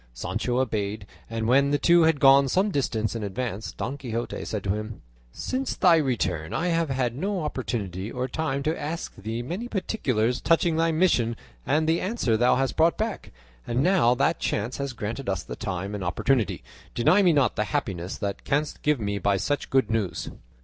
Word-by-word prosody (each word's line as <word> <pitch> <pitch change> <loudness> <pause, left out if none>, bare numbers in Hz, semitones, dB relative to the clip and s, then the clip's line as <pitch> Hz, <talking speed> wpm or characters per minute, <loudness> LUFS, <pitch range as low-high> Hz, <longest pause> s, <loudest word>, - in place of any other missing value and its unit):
Sancho 120 - -2
obeyed, 105 -4 -2 0.2
and 115 -1 -2
when 140 +3 +4
the 145 - +2
two 170 +4 +5
had 160 -2 +3
gone 135 0 +6
some 190 +8 +1
distance 115 - -1
in 115 - -3
advance 110 +1 -4
Don 135 +4 -5
Quixote 120 -2 -4
said 105 -3 -4
to 95 - 0
him, 105 +1 -6 0.3
"Since 260 - -3
thy 175 -2 +5
return 95 - -1
I 180 - 0
have 165 -2 +1
had 125 -3 -1
no 190 +5 -2
opportunity 105 - -3
or 125 0 -2
time 140 -1 -2
to 155 +3 -1
ask 160 +3 -4
thee 110 +4 -4
many 180 - -4
particulars 130 - -1
touching 165 0 +2
thy 165 +1 +2
mission 155 -9 +2 0.3
and 155 +2 +2
the 165 +1 +2
answer 185 - 0
thou 120 +3 +4
hast 135 +1 0
brought 165 +1 +4
back, 220 0 -3 0.4
and 120 +3 +1
now 175 -10 +4
that 150 +5 +1
chance 110 +4 -2
has 140 -2 -3
granted 115 +2 -4
us 95 -2 -1
the - - -7
time 95 +2 -4
and 100 -2 -4
opportunity, 110 - 0 0.3
deny 155 +12 +4
me 180 -3 +5
not 140 -7 +2
the 105 - 0
happiness 95 -2 -3
thou 100 -1 -2
canst 145 +2 -1
give 150 -3 +2
me 100 -2 -2
by 100 +1 +2
such 140 +10 -2
good 130 -5 +2
news." 110 -5 -2
130 Hz, 190 wpm, -26 LUFS, 110-160 Hz, 0.4 s, gone